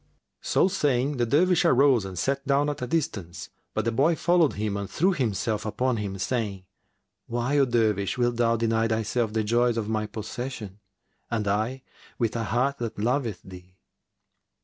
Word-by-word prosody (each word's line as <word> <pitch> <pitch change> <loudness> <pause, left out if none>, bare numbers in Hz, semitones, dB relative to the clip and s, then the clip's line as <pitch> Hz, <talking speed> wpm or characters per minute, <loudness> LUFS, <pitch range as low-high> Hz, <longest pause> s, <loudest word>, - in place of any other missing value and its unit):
So - - +2
saying, 145 -7 0
the 120 -1 +1
Dervish 175 +7 +3
arose 135 - +4
and 95 -2 -7
sat 135 +10 -1
down 140 +1 +2
at 145 - -8
a 125 - -2
distance; 100 - -3 0.2
but - - 0
the 115 - +1
boy 140 +8 +3
followed 170 -2 +3
him 105 0 -2
and 100 -1 -4
threw 190 +4 +2
himself 110 - -1
upon 120 +3 -1
him, 100 -2 -4
saying, 100 -3 -2 0.6
"Why, 120 +5 0
O 140 - +5
Dervish, 110 -5 +1
wilt 120 -1 +1
thou 115 -1 +3
deny 115 0 +1
thyself 110 0 0
the 110 0 0
joys 120 +2 +2
of 110 -2 -2
my 110 -1 -1
possession, 110 -2 -6 0.5
and 110 -3 -1
I 110 +6 -1 0.3
with 115 -2 -1
a 115 -1 -1
heart 130 +6 0
that 115 -2 -4
loveth 115 -2 -1
thee?" 90 0 -13
115 Hz, 170 wpm, -26 LUFS, 105-135 Hz, 0.6 s, O